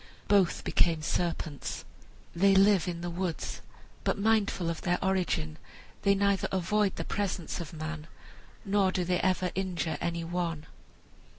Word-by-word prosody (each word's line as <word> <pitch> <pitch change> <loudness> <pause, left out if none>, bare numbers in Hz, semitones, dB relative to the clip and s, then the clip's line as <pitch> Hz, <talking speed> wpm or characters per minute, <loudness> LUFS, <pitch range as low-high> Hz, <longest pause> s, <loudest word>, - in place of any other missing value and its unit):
Both 195 -4 +3
became 165 -3 +2
serpents. 160 -4 -2 0.5
They 195 +3 +5
live 195 -2 +5
in 170 -1 -3
the 175 - -3
woods, 175 -1 -3 0.4
but - - +1
mindful 200 -4 +2
of 165 -1 -2
their 175 0 +1
origin, 175 - 0 0.4
they 200 0 +4
neither 200 -1 +2
avoid 190 +2 +1
the - - -4
presence 190 -5 -2
of 165 - -7
man 155 -1 -5 0.6
nor 195 -1 +3
do 180 -1 -1
they 180 0 +1
ever 185 -1 +1
injure 180 -3 -2
any 170 0 -1
one. 165 -2 -2
180 Hz, 140 wpm, -30 LUFS, 170-195 Hz, 0.6 s, They